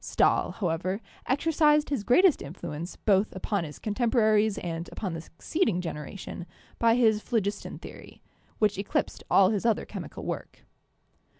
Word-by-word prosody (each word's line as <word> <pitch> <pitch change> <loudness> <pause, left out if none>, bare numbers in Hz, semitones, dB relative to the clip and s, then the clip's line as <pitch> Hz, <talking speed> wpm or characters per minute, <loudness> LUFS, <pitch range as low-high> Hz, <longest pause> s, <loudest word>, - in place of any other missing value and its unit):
Stahl, - - +2
however, 185 +1 -1 0.3
exercised 300 +1 +3
his 260 -8 0
greatest 320 - +5
influence 155 +2 -6
both 200 -1 +1
upon 195 0 -1
his 150 - -9
contemporaries 220 -2 +2
and 165 -1 -4
upon 190 -6 -4
the 165 - -5
succeeding 200 - -1
generation 175 +2 -6 0.3
by 230 0 +4
his 220 -3 +3
phlogiston 210 -4 -2
theory, - - -12 0.3
which 210 -2 +1
eclipsed 200 - -2
all 190 -1 +6
his 205 -3 -1
other 230 -2 +1
chemical - - -7
work. - - -6
210 Hz, 135 wpm, -28 LUFS, 180-230 Hz, 0.3 s, all